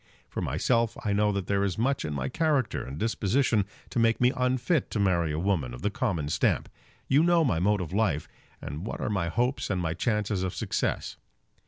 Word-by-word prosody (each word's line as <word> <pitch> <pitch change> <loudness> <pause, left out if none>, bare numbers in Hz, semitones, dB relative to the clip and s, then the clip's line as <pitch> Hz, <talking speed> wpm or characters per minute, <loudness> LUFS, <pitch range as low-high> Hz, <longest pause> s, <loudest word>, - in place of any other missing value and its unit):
For - - -5
myself 115 - +1
I 105 - +1
know 105 +1 +3
that 100 -2 -2
there 100 +1 +1
is 95 -3 -1
much 135 +5 +1
in 75 - -3
my 65 -1 -2
character 150 - 0
and 65 +3 -7
disposition 110 - +1 0.3
to - - 0
make 115 0 +3
me 125 0 +4
unfit 130 +4 +1
to 110 - -2
marry 85 -5 +2
a 75 - -2
woman 80 -9 0
of - - -11
the 105 - +1
common 95 - -1
stamp. - - +1 0.4
You 140 +3 +4
know 170 -1 +4
my 85 - +1
mode 100 +2 +2
of 90 0 -5
life, 95 -8 +1 0.4
and 75 +4 -5
what 110 - -5
are - - -2
my 95 -4 0
hopes 120 +9 0
and 95 -3 0
my 80 -2 -1
chances 105 +1 0
of 95 -1 -2
success. - - -2
105 Hz, 210 wpm, -28 LUFS, 85-120 Hz, 0.4 s, me